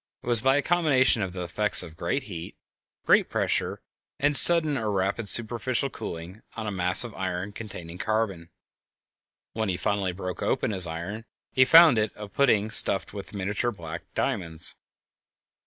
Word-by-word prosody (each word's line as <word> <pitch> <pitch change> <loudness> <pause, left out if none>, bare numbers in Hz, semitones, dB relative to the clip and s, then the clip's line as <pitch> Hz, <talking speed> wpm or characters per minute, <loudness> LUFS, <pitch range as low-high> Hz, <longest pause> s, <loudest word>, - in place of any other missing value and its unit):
It - - -15
was 120 -2 +3
by 135 +2 +2
a 145 - 0
combination 140 -9 +2
of 95 -2 -3
the 90 0 -6
effects 100 +3 +1
of 80 -3 -12
great 85 +12 -3
heat, 85 -8 -9 0.5
great - - +3
pressure, - - -2 0.3
and 145 +1 0
sudden 155 +3 +6
or 110 -5 -2
rapid 100 +2 -2
superficial 120 +3 +1
cooling 85 +6 -8
on 110 - -6
a 105 - -3
mass 90 +1 +4
of 120 -3 -8
iron 95 +1 -4
containing 90 -5 -10
carbon. 100 -6 -2 1.0
When 110 -2 -2
he 90 - -2
finally 100 0 -1
broke 90 -1 -7
open - - -1
his 95 -3 +4
iron 90 +7 -7 0.3
he 130 - +4
found 160 -4 +7
it 105 -1 -1
a 105 0 -9
pudding 110 -2 +1
stuffed 95 - +4
with 100 0 -8
miniature 100 +4 -2
black 85 -4 -9
diamonds. 80 -3 -2
105 Hz, 165 wpm, -25 LUFS, 90-120 Hz, 1.0 s, found